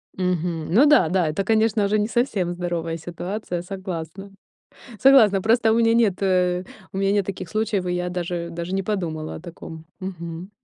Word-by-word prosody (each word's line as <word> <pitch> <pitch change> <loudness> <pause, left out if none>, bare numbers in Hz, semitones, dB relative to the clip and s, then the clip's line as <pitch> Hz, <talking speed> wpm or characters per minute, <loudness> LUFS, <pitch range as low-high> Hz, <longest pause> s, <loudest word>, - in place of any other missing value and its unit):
Мгм. 175 -3 -2
Ну 265 +8 +6
да 295 - +5
да. 180 -2 +1
Это, 155 +6 -1
конечно, 220 0 +2
уже 210 +1 +1
не 210 - +1
совсем 220 -7 0
здоровая 170 -2 -3
ситуация, 175 +2 -5
согласна. 185 0 -7 0.7
Согласна, 225 -8 +6
просто 225 +2 +3
у 225 - +3
меня 230 -1 +4
нет, 225 -5 +3
э, 180 -2 +1 0.3
у - - -6
меня 195 0 +1
нет 205 -2 +1
таких 185 -3 -6
случаев, 215 -3 -1
и 180 - -1
я 180 0 -2
даже 175 -1 -3
даже 170 +2 -5
не 195 - 0
подумала 165 -7 -3
о - - -7
таком. 165 -2 -10
Мгм. 175 -1 -7
185 Hz, 180 wpm, -23 LUFS, 175-210 Hz, 0.7 s, Ну